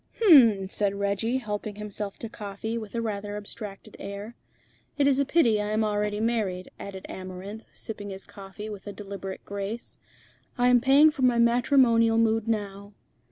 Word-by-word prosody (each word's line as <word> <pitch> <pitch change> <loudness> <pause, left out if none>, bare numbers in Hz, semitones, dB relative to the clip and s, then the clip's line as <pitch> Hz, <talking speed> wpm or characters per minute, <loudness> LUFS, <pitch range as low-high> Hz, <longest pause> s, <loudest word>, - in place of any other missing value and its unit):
"H'm!" 240 - +7
said 200 0 0
Reggie, 200 +5 0
helping 210 -3 -4
himself 210 -1 -5
to 230 - -6
coffee 210 +1 -5
with 220 -1 -6
a 230 - 0
rather 205 -1 -3
abstracted 210 -1 -8
air. 200 +3 -7 0.6
"It 285 - +3
is 275 -1 +3
a 280 - +3
pity 235 -9 +3
I 210 - -2
am 215 +1 +1
already 210 0 -1
married," 215 -5 -1
added 190 -1 -8
Amarinth, 190 +4 -8
sipping 205 -2 -7
his 195 0 -7
coffee 200 +2 -9
with 205 -2 -8
a 205 - -5
deliberate 195 -2 -7
grace. 200 +4 -5 0.6
"I 245 0 +4
am 245 -1 +5
paying 280 +4 +6
for 290 - -7
my 250 -2 +4
matrimonial 235 -1 +4
mood 225 -1 +2
now." 200 -2 -3
210 Hz, 165 wpm, -27 LUFS, 200-235 Hz, 0.6 s, H'm